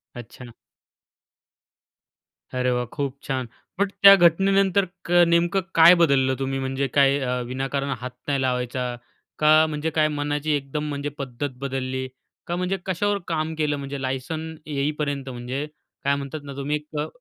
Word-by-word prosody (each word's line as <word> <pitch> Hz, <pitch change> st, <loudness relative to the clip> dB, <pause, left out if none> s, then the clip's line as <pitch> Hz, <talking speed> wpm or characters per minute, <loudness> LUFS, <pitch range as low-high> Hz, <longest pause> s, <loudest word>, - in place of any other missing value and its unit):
अच्छा. 120 Hz, 0 st, -10 dB, 2.1 s
अरे 125 Hz, 0 st, +1 dB
वाह! 125 Hz, 0 st, 0 dB
खूप 140 Hz, -2 st, -3 dB
छान. 130 Hz, -2 st, -3 dB, 0.3 s
बट 200 Hz, -1 st, +1 dB
त्या 200 Hz, 0 st, +11 dB
घटनेनंतर 195 Hz, +2 st, +2 dB, 0.2 s
क 175 Hz, -, -6 dB, 0.2 s
नेमकं 175 Hz, +3 st, +2 dB
काय 165 Hz, +2 st, +9 dB
बदललं 135 Hz, -6 st, +3 dB
तुम्ही? 135 Hz, 0 st, -2 dB
म्हणजे 135 Hz, +1 st, -1 dB
काय 140 Hz, 0 st, +5 dB
अ, 125 Hz, -1 st, -1 dB
विनाकारण 135 Hz, +2 st, -2 dB
हात 125 Hz, 0 st, -5 dB, 0.2 s
नाही 140 Hz, -2 st, 0 dB
लावायचा? 125 Hz, -1 st, -1 dB, 0.4 s
का 155 Hz, +1 st, +6 dB
म्हणजे 155 Hz, 0 st, -2 dB
काय 155 Hz, 0 st, +4 dB
मनाची 145 Hz, +1 st, -1 dB
एकदम 145 Hz, +2 st, -3 dB
म्हणजे 145 Hz, 0 st, -3 dB
पद्धत 135 Hz, +1 st, -4 dB
बदलली? 130 Hz, -1 st, -3 dB, 0.4 s
का 175 Hz, -, -1 dB
म्हणजे 180 Hz, +2 st, -1 dB
कशावर 200 Hz, +2 st, 0 dB
काम 160 Hz, -1 st, -1 dB
केलं? 150 Hz, -2 st, 0 dB
म्हणजे 140 Hz, 0 st, -6 dB
लायसन्स 155 Hz, +5 st, -4 dB
येईपर्यंत 145 Hz, -1 st, -2 dB
म्हणजे 125 Hz, +4 st, -4 dB, 0.4 s
काय 140 Hz, 0 st, +2 dB
म्हणतात 140 Hz, +2 st, -6 dB
ना, 140 Hz, -, -8 dB
तुम्ही 140 Hz, +2 st, -1 dB
एक 150 Hz, 0 st, -6 dB
अ, 150 Hz, -, -1 dB
140 Hz, 150 wpm, -24 LUFS, 130-155 Hz, 2.1 s, त्या